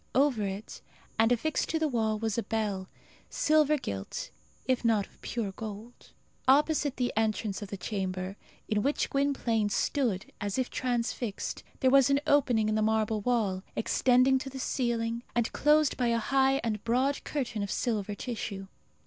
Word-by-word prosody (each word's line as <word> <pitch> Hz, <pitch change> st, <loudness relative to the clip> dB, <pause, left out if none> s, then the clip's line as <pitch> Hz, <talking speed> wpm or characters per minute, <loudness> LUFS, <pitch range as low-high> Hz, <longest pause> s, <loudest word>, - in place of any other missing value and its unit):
Over 270 Hz, -4 st, +3 dB
it, 195 Hz, +2 st, -5 dB, 0.4 s
and 225 Hz, +1 st, +4 dB
affixed 290 Hz, +6 st, 0 dB
to 325 Hz, -, +1 dB
the 320 Hz, -1 st, +1 dB
wall, 220 Hz, -5 st, 0 dB
was 220 Hz, -1 st, -1 dB
a 235 Hz, -, 0 dB
bell, 205 Hz, -5 st, -2 dB, 0.4 s
silver 305 Hz, -1 st, +3 dB
gilt, 100 Hz, -, -5 dB, 0.4 s
if 255 Hz, -2 st, +1 dB
not 220 Hz, -4 st, +3 dB
of -, -, -25 dB
pure 225 Hz, -5 st, -3 dB
gold. 220 Hz, +3 st, -9 dB, 0.4 s
Opposite 290 Hz, +1 st, +3 dB
the 245 Hz, -1 st, 0 dB
entrance 215 Hz, -1 st, 0 dB
of 205 Hz, -, -5 dB
the 200 Hz, -, -6 dB
chamber, 185 Hz, -1 st, -3 dB, 0.3 s
in 210 Hz, -1 st, +1 dB
which 285 Hz, +6 st, 0 dB
Gwynplaine 260 Hz, -6 st, +1 dB
stood 220 Hz, -3 st, -1 dB
as 205 Hz, +1 st, -2 dB
if 255 Hz, -1 st, -1 dB
transfixed, 240 Hz, -3 st, -2 dB, 0.2 s
there 260 Hz, -2 st, +4 dB
was 275 Hz, -1 st, +6 dB
an 275 Hz, 0 st, +4 dB
opening 245 Hz, -7 st, +3 dB
in 215 Hz, -, +1 dB
the 215 Hz, -, +1 dB
marble 220 Hz, 0 st, +1 dB
wall, 210 Hz, -5 st, 0 dB
extending 255 Hz, +3 st, +3 dB
to 270 Hz, -, -6 dB
the 265 Hz, -, -8 dB
ceiling, 235 Hz, -3 st, -1 dB
and 235 Hz, -2 st, 0 dB
closed 300 Hz, 0 st, +3 dB
by 245 Hz, -, +1 dB
a 235 Hz, 0 st, +2 dB
high 270 Hz, +3 st, +2 dB
and 215 Hz, -3 st, -2 dB
broad 260 Hz, +4 st, +1 dB
curtain 245 Hz, -7 st, -3 dB
of 200 Hz, -, -3 dB
silver 210 Hz, -2 st, -1 dB
tissue. 210 Hz, -4 st, -5 dB
230 Hz, 165 wpm, -29 LUFS, 210-265 Hz, 0.4 s, was